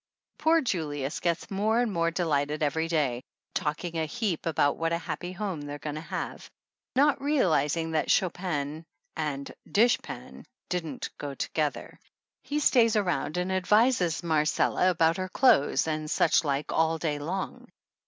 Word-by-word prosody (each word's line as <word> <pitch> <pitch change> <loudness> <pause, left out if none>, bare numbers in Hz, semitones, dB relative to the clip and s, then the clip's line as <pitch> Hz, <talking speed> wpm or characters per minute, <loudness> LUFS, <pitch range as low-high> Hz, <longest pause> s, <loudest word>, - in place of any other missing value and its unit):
Poor 325 +1 +4
Julius 150 - -2
gets 170 +2 -1
more 215 +4 +1
and 240 -3 +1
more 170 -1 +2
delighted 150 -3 0
every 160 +3 0
day, 145 -7 0 0.3
talking 165 0 -2
a 160 - -1
heap 195 -4 -2
about 145 -3 +2
what 165 0 -1
a - - +2
happy 175 +1 -5
home 185 -4 -4
they're 145 0 -6
going 150 0 -5
to 155 - -5
have, 165 - -5 0.5
not 280 +1 +3
realizing 165 - +1
that 160 - 0
Chopin 165 -4 0 0.3
and 145 -3 -3 0.2
dish 235 +4 +4
pan - - -9 0.3
don't 175 -3 -3
go 145 -1 -5
together. 150 +2 -3 0.4
He 295 +1 -2
stays 235 -6 +4
around 180 -5 0
and 180 +1 -1
advises 190 -2 +2
Marcella 160 +3 +2
about 165 -1 +2
her 185 0 -3
clothes 185 - +4
and 155 -1 -2
such - - +3
like 145 -1 -1
all 160 0 +2
day 150 -3 -2
long. 180 +6 -4
165 Hz, 155 wpm, -28 LUFS, 150-190 Hz, 0.5 s, Poor